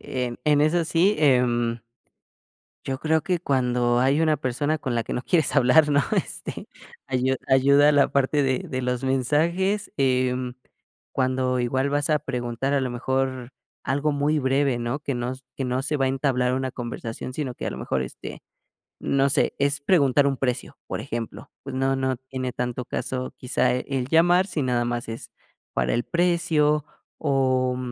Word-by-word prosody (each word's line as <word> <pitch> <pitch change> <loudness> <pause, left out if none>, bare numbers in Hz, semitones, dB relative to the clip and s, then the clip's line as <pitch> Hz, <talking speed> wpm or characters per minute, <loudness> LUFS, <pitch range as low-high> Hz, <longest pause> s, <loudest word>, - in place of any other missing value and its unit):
em, 125 -2 -3
en 150 -1 +4
eso 165 +3 +2
sí, 175 +6 +3
em. 120 -4 +2 1.0
Yo 135 -1 -3
creo 160 +2 +1
que 180 +2 -1
cuando 125 -5 +1
hay 135 +5 +3
una 155 -2 +2
persona 145 +5 -1
con 130 -5 -3
la 115 - +1
que - - -6
no - - -1
quieres 160 0 +1
hablar, 145 +3 +5
¿no?, 145 0 +4 0.2
este, - - -4 0.4
ayu 130 0 +1
ayuda 140 +2 +5
la 145 -1 +4
parte 140 +1 +2
de 130 -2 +1
de 130 - -4
los 125 0 -2
mensajes, 170 - 0
eh, 130 -1 +2 0.8
cuando 130 -1 0
igual 130 +3 0
vas 145 +1 0
a 155 - +3
preguntar, 125 0 -2
a 140 - +2
lo 130 - -2
mejor, 130 0 -2 0.3
algo 145 +3 0
muy 145 +2 +1
breve, 135 -1 +1
¿no?, 120 +3 -2
que 145 -2 -3
no 120 +1 -2 0.2
que 135 - -2
no 125 0 -1
se 145 +3 -1
va 135 - +1
a - - +2
entablar 130 -2 +1
una 130 0 -1
conversación, 120 0 -6
sino 130 -2 -4
que - - -6
a - - -1
lo - - -6
mejor, 65 - -1
este, 65 - -8 0.6
no 140 0 +1
sé, - - +1
es 140 +1 +1
preguntar 140 -3 +3
un 140 - +1
precio, 125 -2 -3
por - - -4
ejemplo. 115 -2 -6
Pues 135 -1 -6
no 135 0 +1
no 130 -1 -1
tiene 130 -1 -3
tanto 125 0 -3
caso, 130 +1 -4
quizá, 125 +1 +1
el 130 0 -2
llamar 175 +4 +4
si 170 -5 -2
nada 125 -2 +1
más 120 0 -3
es 115 0 -7 0.4
para 60 0 0
el 120 - 0
precio, 165 -3 +2 0.4
o 130 -3 +1
130 Hz, 175 wpm, -24 LUFS, 125-145 Hz, 1.0 s, hablar